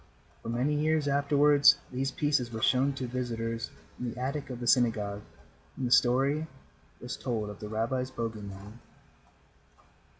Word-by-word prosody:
For - - -7
many 125 +6 0
years 155 0 +1
afterward 145 +1 +3 0.2
these 135 +1 -1
pieces 145 -4 0
were 110 -1 -5
shown 135 +2 +3
to 130 -1 -4
visitors 115 -2 -3 0.3
in 125 - -2
the - - -9
attic 135 +3 -3
of 125 -2 -6
the 120 - -5
synagogue 110 -4 +2 0.5
when 130 - -3
the 120 - -2
story 135 +6 +3 0.5
was 125 +2 -5
told 110 -5 -3
of 105 - -11
the 105 - -7
rabbi's 115 +4 -1
bogey 115 -4 -4
man. 100 +3 -10
125 Hz, 155 wpm, -29 LUFS, 115-140 Hz, 0.5 s, afterward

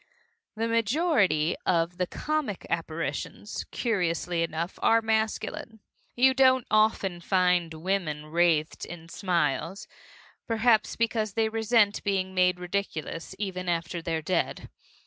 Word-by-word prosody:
The 225 +1 -1
majority 230 - +2
of 175 0 0
the 180 - +1
comic 300 -8 -3
apparitions, 165 +4 -3
curiously 175 -6 -1
enough, 165 +2 -3
are 230 - +5
masculine. 220 0 -2 0.4
You 260 +2 +5
don't 260 -2 +4
often 215 -5 +2
find 180 -2 +2
women 160 -3 -2
wraithed 160 -1 +1
in 170 -1 -9
smiles 170 -1 -1 0.6
perhaps 225 -1 +2
because 220 -2 0
they 225 0 +1
resent 220 -1 +2
being 190 -2 -1
made 180 -1 +2
ridiculous, 180 -2 -4
even 185 -3 -3
after 170 0 -2
they're 165 -1 -2
dead. 180 +2 -2
185 Hz, 115 wpm, -27 LUFS, 170-220 Hz, 0.6 s, are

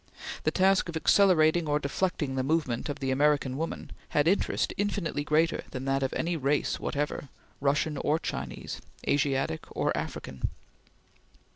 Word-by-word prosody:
The - - +5
task 190 -1 +3
of 165 - -2
accelerating 170 -3 +4
or 145 0 +2
deflecting 150 0 -1
the 130 - 0
movement 140 -3 0
of 145 - -3
the 135 -2 -1
American 140 -1 +2
woman 160 +4 -4 0.2
had 145 +1 +2
interest 195 +4 +1
infinitely 200 -7 -1
greater 160 +3 +2
than 130 0 -5
that 135 0 +1
of 135 - 0
any 170 +1 -1
race 145 -1 0
whatever, 145 -1 -2 0.3
Russian 145 +2 +1
or 150 +3 +1
Chinese, - - -5 0.3
Asiatic 135 - +1
or - - 0
African. 65 -1 -4
150 Hz, 145 wpm, -29 LUFS, 135-165 Hz, 0.3 s, The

